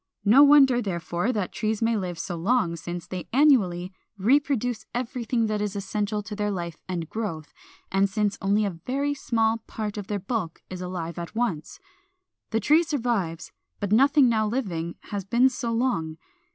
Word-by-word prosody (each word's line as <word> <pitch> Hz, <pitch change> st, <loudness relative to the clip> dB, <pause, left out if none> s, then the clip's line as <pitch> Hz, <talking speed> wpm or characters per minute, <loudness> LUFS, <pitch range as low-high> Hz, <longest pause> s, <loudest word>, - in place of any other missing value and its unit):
No 230 Hz, +7 st, +7 dB
wonder, 280 Hz, -4 st, +7 dB
therefore, 175 Hz, +1 st, -2 dB
that 205 Hz, -6 st, -2 dB
trees 215 Hz, -1 st, -1 dB
may 230 Hz, 0 st, +1 dB
live 180 Hz, -4 st, -3 dB
so 175 Hz, +1 st, -4 dB
long, 175 Hz, 0 st, +1 dB
since 175 Hz, +1 st, -6 dB
they 185 Hz, -1 st, -6 dB
annually 195 Hz, -11 st, +3 dB, 0.2 s
reproduce 245 Hz, +1 st, +1 dB
everything 240 Hz, -1 st, -1 dB
that 215 Hz, -1 st, -1 dB
is 210 Hz, -1 st, -2 dB
essential 210 Hz, +1 st, -2 dB
to 210 Hz, +1 st, -7 dB
their 210 Hz, 0 st, -1 dB
life 170 Hz, -4 st, -5 dB
and 170 Hz, -3 st, -3 dB
growth, 165 Hz, -8 st, -5 dB, 0.4 s
and 195 Hz, +1 st, +2 dB
since 205 Hz, 0 st, 0 dB
only 205 Hz, +2 st, +2 dB
a 200 Hz, -, -1 dB, 0.2 s
very 280 Hz, +3 st, 0 dB
small 225 Hz, -4 st, 0 dB
part 210 Hz, -1 st, -4 dB
of 200 Hz, -, -7 dB
their 205 Hz, -, -1 dB
bulk 195 Hz, -4 st, -4 dB
is 185 Hz, -1 st, -6 dB
alive 175 Hz, -2 st, -5 dB
at 170 Hz, +5 st, -7 dB
once. 230 Hz, -, -2 dB, 0.7 s
The 225 Hz, -, +1 dB
tree 300 Hz, +10 st, +4 dB
survives, 235 Hz, -, -2 dB, 0.3 s
but 205 Hz, -1 st, -3 dB
nothing 275 Hz, +4 st, +5 dB
now 220 Hz, -2 st, +2 dB
living 180 Hz, -8 st, -3 dB, 0.2 s
has 200 Hz, -2 st, -2 dB
been 235 Hz, +7 st, +4 dB
so 240 Hz, -2 st, -3 dB
long. 225 Hz, -10 st, -1 dB
210 Hz, 170 wpm, -25 LUFS, 180-245 Hz, 0.7 s, No